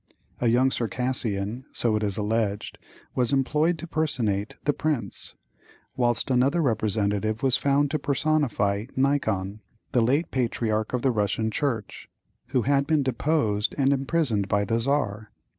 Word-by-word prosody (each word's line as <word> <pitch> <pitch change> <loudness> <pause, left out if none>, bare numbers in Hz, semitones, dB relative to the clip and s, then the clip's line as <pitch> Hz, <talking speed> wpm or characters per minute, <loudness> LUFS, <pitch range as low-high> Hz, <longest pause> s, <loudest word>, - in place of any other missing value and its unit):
A 120 - +1
young 125 +3 +3
Circassian, 120 -2 -2
so 115 -2 +1
it 105 - 0
is 100 -3 -1
alleged, 105 -1 -1 0.3
was 125 -2 +1
employed 150 +5 +2
to 170 - -7
personate 115 -11 -1
the 145 - +3
prince, 135 -12 -3 0.6
whilst 120 -1 0
another 130 +7 +3
representative 110 - 0
was 130 -2 +4
found 140 +1 +2
to 155 - 0
personify 135 -8 0
Nikon, 110 -8 0 0.3
the 125 - +3
late 140 +8 +1
patriarch 115 -3 -1
of 125 - -1
the 135 - +3
Russian 110 0 0
Church, 115 -5 -3 0.4
who 130 -2 0
had 140 +2 +2
been 155 -3 +2
deposed 125 -5 0
and 140 -1 +3
imprisoned 135 -7 0
by 100 +1 +1
the 115 +2 0
Czar. 110 -5 -1
120 Hz, 140 wpm, -25 LUFS, 105-140 Hz, 0.6 s, was